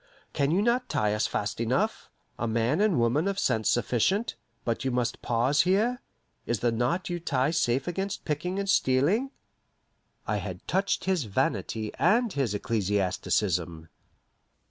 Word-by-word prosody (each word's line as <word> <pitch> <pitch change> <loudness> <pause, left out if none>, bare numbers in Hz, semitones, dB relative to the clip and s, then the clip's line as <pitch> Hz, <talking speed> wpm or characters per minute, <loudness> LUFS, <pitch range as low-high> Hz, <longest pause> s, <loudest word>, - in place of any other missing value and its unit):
Can 140 -1 +1
you 185 +6 +2
not 245 +2 +1
tie 105 -1 +1
us 105 - +1
fast 105 +2 -3
enough, 130 - 0 0.3
a 120 - -1
man 115 - +1
and 210 -6 +3
woman 120 +9 +2
of 200 -1 -1
sense 115 - +1
sufficient, 150 - +1 0.3
but 115 +1 -1
you 135 - 0
must 125 -1 -1
pause 125 +4 +2
here? 220 +8 +1 0.5
Is 120 -3 -1
the 120 - +2
knot 125 +11 -1
you 175 - -2
tie 140 -3 0
safe 135 -5 +1
against 195 +3 -3
picking 170 +5 -2
and 200 0 -2
stealing?" 180 - +2 1.0
I - - 0
had - - -7
touched 195 +1 0
his 185 -8 +1
vanity 110 +1 -1
and 225 +5 +3
his 130 -7 0
ecclesiasticism. 95 -5 -1
135 Hz, 150 wpm, -27 LUFS, 115-190 Hz, 1.0 s, and